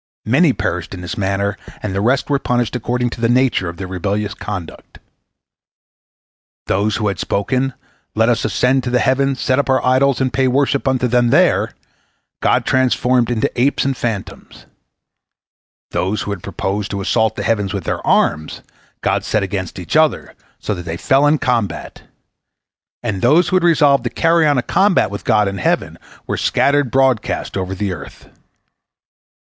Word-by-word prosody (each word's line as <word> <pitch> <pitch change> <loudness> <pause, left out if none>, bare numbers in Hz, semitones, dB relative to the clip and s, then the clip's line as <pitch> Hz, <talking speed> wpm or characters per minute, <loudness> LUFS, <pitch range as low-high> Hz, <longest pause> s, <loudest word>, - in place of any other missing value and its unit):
Many - - +4
perished - - -3
in 90 - -9
this 90 +5 -5
manner, 100 -1 -1 0.3
and 105 -3 -3
the 100 - -1
rest 125 +5 +1
were 140 -1 +1
punished 120 -3 -1
according 125 0 -1
to 120 - -8
the 115 - +2
nature 125 -7 +2
of 85 - -9
their 95 - -5
rebellious 100 +3 -2
conduct. 100 -7 -8 1.7
Those 105 +2 0
who 105 - -1
had 100 -3 -2
spoken, 130 +6 -1 0.4
"Let 110 +1 +3
us 120 -1 +1
ascend 125 +2 +1
into 130 -1 -1
the 125 - +2
heavens, 135 +1 +1
set 130 +1 +1
up 140 - -1
our 130 0 +2
idols, 130 +1 +3
and 130 -1 0
pay 130 -1 +2
worship 140 +1 +1
unto 130 -1 +1
them 120 0 +2
there," - - +2 0.7
God - - +2
transformed 125 -2 +2
into 115 -2 0
apes 140 +1 +1
and 135 -1 0
phantoms; 115 -5 -6 1.3
those 95 +3 -1
who 105 - -4
had 100 -4 -5
proposed 100 +3 -3
to 100 -1 -4
assault 110 +2 +1
the - - -4
heavens 105 -4 0
with - - -4
their - - -3
arms, 75 0 +1 0.4
God - - 0
set 105 - 0
against 95 -2 -4
each 90 - -5
other 155 -1 +2 0.2
so 105 - -3
that 90 -3 -7
they 85 0 -4
fell 135 +8 +3
in 150 - +4
the - - -4
combat; 115 -8 -2 1.0
and 105 -5 -3
those 165 +3 +4
who - - 0
had 185 - +2
resolved 150 -6 +4
to - - 0
carry 165 -1 +2
on 145 -2 +2
a 125 - +1
combat 190 - +2
with 100 - -6
God 105 -1 +2
in 100 0 -4
heaven - - -1 0.3
were - - -3
scattered 140 -2 +2
broadcast 130 -3 0
over 95 0 -3
the 95 0 -2
earth. 70 -5 -11
120 Hz, 175 wpm, -18 LUFS, 100-135 Hz, 1.7 s, Many